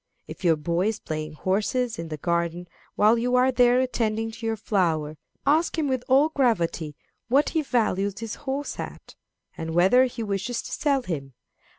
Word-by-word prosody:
If -, -, -10 dB
your 170 Hz, -2 st, +4 dB
boy 170 Hz, +5 st, 0 dB
is 220 Hz, -, -1 dB
playing 155 Hz, 0 st, -5 dB
horses 210 Hz, -, -1 dB
in 165 Hz, -, -4 dB
the 155 Hz, -1 st, -5 dB
garden 170 Hz, +2 st, -1 dB, 0.3 s
while 215 Hz, +3 st, +4 dB
you 250 Hz, +2 st, +1 dB
are 255 Hz, +1 st, +4 dB
there 245 Hz, 0 st, +4 dB
attending 225 Hz, -3 st, -1 dB
to 225 Hz, +1 st, -8 dB
your 225 Hz, -, 0 dB
flowers, 165 Hz, -8 st, 0 dB, 0.3 s
ask 315 Hz, +4 st, +2 dB
him 310 Hz, -2 st, +1 dB
with 260 Hz, -2 st, -1 dB
all 275 Hz, +4 st, +5 dB
gravity 175 Hz, -, 0 dB, 0.3 s
what 275 Hz, +5 st, +3 dB
he 320 Hz, -, 0 dB
values 205 Hz, -7 st, 0 dB
his 225 Hz, -1 st, -5 dB, 0.2 s
horse 280 Hz, +2 st, -3 dB
at, -, -, -8 dB, 0.4 s
and 160 Hz, 0 st, -5 dB
whether 195 Hz, +9 st, +5 dB
he 235 Hz, -2 st, -4 dB
wishes 205 Hz, +3 st, -2 dB
to -, -, -8 dB
sell 280 Hz, -3 st, +1 dB
him. 140 Hz, -, -5 dB
220 Hz, 180 wpm, -25 LUFS, 170-250 Hz, 0.4 s, all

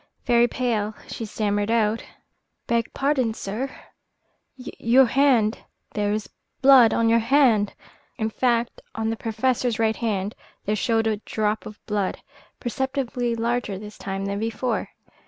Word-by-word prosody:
Very 240 Hz, -1 st, +4 dB
pale, 220 Hz, -4 st, -1 dB
she 225 Hz, -, -5 dB
stammered 205 Hz, -1 st, -1 dB
out: 225 Hz, -1 st, +1 dB, 0.6 s
"Beg 235 Hz, -1 st, 0 dB
pardon, 265 Hz, -5 st, 0 dB
sir, 225 Hz, +8 st, -4 dB, 0.9 s
your 255 Hz, 0 st, +3 dB
hand 240 Hz, -4 st, +3 dB, 0.3 s
there 205 Hz, -1 st, 0 dB
is 215 Hz, 0 st, -2 dB, 0.3 s
blood 260 Hz, -4 st, +7 dB
upon 230 Hz, -, +2 dB
your 230 Hz, +1 st, +5 dB
hand." 230 Hz, -4 st, +3 dB, 0.4 s
In 220 Hz, -2 st, -1 dB
fact, 240 Hz, 0 st, 0 dB
on 225 Hz, 0 st, -1 dB
the -, -, -1 dB
Professor's 235 Hz, +1 st, 0 dB
right 220 Hz, -1 st, +2 dB
hand 205 Hz, -3 st, -1 dB, 0.3 s
there 210 Hz, -, +1 dB
showed 225 Hz, +1 st, +1 dB
a 220 Hz, -1 st, +1 dB
drop 215 Hz, 0 st, -2 dB
of 215 Hz, -, -11 dB
blood, 205 Hz, -3 st, -1 dB, 0.4 s
perceptibly 250 Hz, -2 st, -2 dB
larger 230 Hz, -3 st, -1 dB
this 210 Hz, +2 st, -10 dB
time 195 Hz, 0 st, -4 dB
than 200 Hz, 0 st, -2 dB
before. 225 Hz, +3 st, -2 dB
225 Hz, 140 wpm, -24 LUFS, 210-245 Hz, 0.9 s, blood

